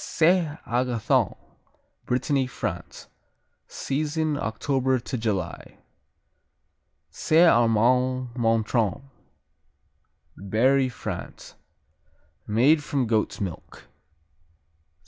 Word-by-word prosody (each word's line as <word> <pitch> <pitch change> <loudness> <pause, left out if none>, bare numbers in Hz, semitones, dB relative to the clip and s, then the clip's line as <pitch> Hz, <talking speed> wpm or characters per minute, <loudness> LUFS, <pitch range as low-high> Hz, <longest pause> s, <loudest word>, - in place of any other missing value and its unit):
Saint 165 -2 +2
Agathon 120 -2 0 0.7
Brittany, 130 +1 0
France 125 - -6 0.6
Season, 155 +2 -2
October 130 +1 0
to 125 +2 -6
July. 105 -7 -4 1.3
Saint 165 +3 +4
Amand 125 +3 +2
Montrond 115 -2 0 1.3
Berry, 130 +7 +2
France 120 - -7 0.9
Made 135 +9 +3
from 140 -4 -1
goat's 110 -2 -1
milk. 95 -5 -7
125 Hz, 70 wpm, -25 LUFS, 115-140 Hz, 1.3 s, Saint